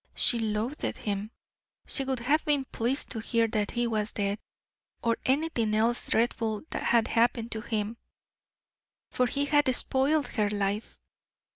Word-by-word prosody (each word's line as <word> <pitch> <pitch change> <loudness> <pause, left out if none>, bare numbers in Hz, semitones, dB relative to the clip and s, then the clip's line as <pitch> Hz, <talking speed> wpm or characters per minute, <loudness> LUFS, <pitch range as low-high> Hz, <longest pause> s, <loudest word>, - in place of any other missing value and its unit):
She 240 - +4
loathed 225 +6 -2
him; 205 0 -3 0.6
she 270 - 0
would 265 -1 -1
have 280 +6 +1
been 290 -3 +1
pleased 245 +5 -1
to 225 - -3
hear 230 +1 +1
that 210 -2 0
he 240 0 0
was 215 -2 -1
dead, 200 0 -1 0.6
or 230 -1 +2
anything 260 -6 +1
else 230 +2 +1
dreadful 225 -2 0
had 235 -1 +2
happened 235 0 +1
to 220 - -2
him, 220 0 -2 1.1
for 250 - +2
he 280 +3 0
had 290 0 +3
spoiled 285 +4 +2
her 210 -3 0
life. 205 +1 -2
230 Hz, 145 wpm, -28 LUFS, 215-265 Hz, 1.1 s, She